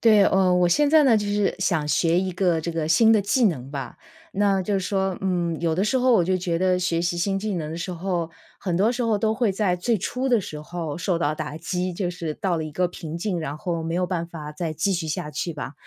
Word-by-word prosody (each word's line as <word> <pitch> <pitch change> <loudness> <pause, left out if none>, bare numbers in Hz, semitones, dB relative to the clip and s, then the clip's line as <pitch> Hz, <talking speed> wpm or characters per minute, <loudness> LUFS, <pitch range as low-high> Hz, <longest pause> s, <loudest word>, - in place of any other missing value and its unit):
对 215 -3 +6
呃， 190 -2 +3
我 180 -1 +3
现 290 +12 +3
在 315 -2 +6
呢， 245 -5 +5
就 205 -1 -1
是 205 -1 +1
想 165 -5 0
学 165 +3 +2
一 190 0 -2
个 175 -3 +1
这 170 - -3
个 165 -2 -2
新 220 +7 +5
的 215 - +4
技 230 +5 +2
能 135 -8 -2
吧。 135 -4 -6 0.4
那 200 -2 +3
就 200 +1 0
说 190 -1 -1
嗯， 175 -4 0
有 165 -1 +1
的 185 - 0
时 235 +5 +1
候 255 0 +3
我 205 -7 +5
就 185 +2 +1
觉 175 -2 -1
得 185 0 +2
学 175 -2 0
习 175 0 -1
新 195 +2 0
技 210 0 -3
能 155 -3 -3
的 165 - -5
时 175 - -4
候， 175 -1 -2 0.3
很 180 -3 -1
多 210 +6 +3
时 250 0 -2
候 225 -2 +2
都 220 +1 +1
会 225 -2 +1
在 195 -2 +1
最 225 +6 +1
初 255 +8 -2
的 245 -2 +4
时 155 -5 -7
候 160 -1 -5
受 175 0 0
到 150 -2 0
打 155 -1 -5
击。 180 +2 -2
就 175 0 -2
是 170 -3 -5
到 180 0 -1
了 - - -2
一 155 - -6
个 180 +4 +1
瓶 165 -2 -7
颈， 180 -1 -2
然 145 -2 -4
后 170 0 -3
没 165 +1 -3
有 180 +1 +1
办 170 -2 -2
法 150 -3 -8
再 165 0 -3
继 160 +6 0
续 170 -3 -2
下 150 0 -3
去 170 +3 -3
吧， 145 -2 -6
180 Hz, 285 characters per minute, -24 LUFS, 165-200 Hz, 0.4 s, 对